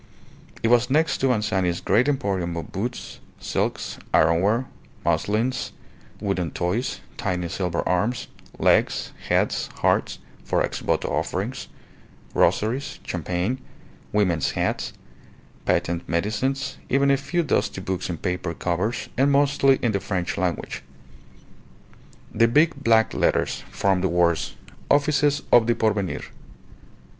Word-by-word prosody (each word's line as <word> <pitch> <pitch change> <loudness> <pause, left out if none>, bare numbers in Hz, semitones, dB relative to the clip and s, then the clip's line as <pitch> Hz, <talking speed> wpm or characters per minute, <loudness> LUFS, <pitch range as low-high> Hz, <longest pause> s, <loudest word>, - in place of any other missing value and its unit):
It 115 - +3
was 120 +1 +4
next 150 +2 +2
to 135 - +2
Anzani's 95 -7 +1
great 125 +5 +2
emporium 95 -10 -1
of 85 - -6
boots, 120 +6 -4 0.2
silks, - - -2 0.2
ironware, 95 +10 +3 0.4
muslins, 105 +9 0 0.5
wooden 95 -4 -1
toys, 90 - -2 0.2
tiny 90 -5 -1
silver 90 -2 -2
arms, 110 +7 0 0.3
legs, - - +2 0.2
heads, - - +1 0.2
hearts - - +2 0.3
(for - - +1
ex - - -3
voto - - 0
offerings), - - -2 0.7
rosaries, 130 +7 +1
champagne, 90 - -2 0.5
women's 90 -8 +2
hats, - - -1 0.7
patent 85 0 0
medicines, 120 +10 -1
even 140 +1 +3
a - - +5
few 145 +6 -1
dusty 140 - 0
books 95 -1 -3
in 85 - -3
paper 90 -1 -3
covers 90 +8 -1
and 140 +2 +4
mostly 140 -1 +4
in 120 - +3
the 100 - 0
French 95 -2 -2
language. 90 -3 -2 1.5
The 115 +2 +4
big 155 +7 +4
black 115 -2 +4
letters - - +1
formed 95 -2 +1
the 95 - +2
words, 85 -1 +1 0.3
"Offices 145 0 +3
of 120 -2 +6
the 120 - +3
Porvenir." 105 -4 0
105 Hz, 120 wpm, -24 LUFS, 90-130 Hz, 1.5 s, of